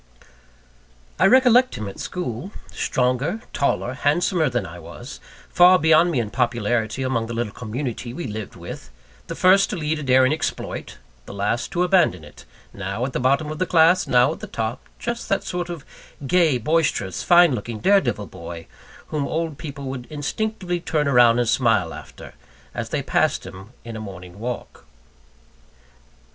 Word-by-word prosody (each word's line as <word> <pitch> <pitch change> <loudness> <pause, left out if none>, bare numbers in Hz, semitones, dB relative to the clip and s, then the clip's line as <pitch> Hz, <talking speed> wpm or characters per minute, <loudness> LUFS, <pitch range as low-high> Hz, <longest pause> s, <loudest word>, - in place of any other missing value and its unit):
I - - +6
recollect 255 +2 +5
him 110 -3 -5
at 100 - -9
school 175 - -4 0.2
stronger, 130 - 0
taller, 140 -3 0
handsomer 160 +3 +1
than 120 -5 -2
I 85 0 -9
was; 85 - -10 0.3
far 180 +1 +6
beyond 160 +1 +4
me 150 -7 0
in 110 -3 -3
popularity 120 -1 0
among 120 -3 -1
the 115 - -5
little 115 -3 -2
community 120 +1 -5
we 170 +8 -6
lived 110 -3 -6
with; 85 -1 -9 0.4
the - - -5
first 190 +2 +5
to - - -3
lead 155 -2 -2
a - - -5
daring 130 0 +4
exploit, 155 - -4 0.3
the - - -8
last 105 +6 -1
to 175 - +2
abandon 175 - +3
it; 75 0 -14 0.3
now 100 +4 -3
at 130 - -5
the - - -1
bottom 140 +4 +1
of 155 - -6
the 185 - 0
class, 170 +2 +4
now 125 0 +4
at - - -11
the - - -7
top 115 +1 -3 0.2
just 235 0 -4
that 195 - +1
sort 175 -1 -4
of 170 -5 -7 0.4
gay, 160 -2 +3
boisterous, 145 - 0
fine 175 -4 +6
looking, 115 -1 -4
dare 195 - +4
devil 105 - -2
boy, 85 -3 -9 0.4
whom 150 -2 -2
old 160 -2 -3
people 145 -3 -7
would 130 -2 -6
instinctively 180 +4 -3
turn 155 -3 -1
round 120 -3 +5
and 120 - +1
smile 110 -9 +2
after, - - -11 0.4
as - - -4
they - - -2
passed - - +1
him 95 +1 -10
by - - -20 0.2
in 115 -1 -7
a 110 - -6
morning 90 -2 -10
walk. 120 +2 -6
130 Hz, 175 wpm, -22 LUFS, 110-165 Hz, 0.4 s, I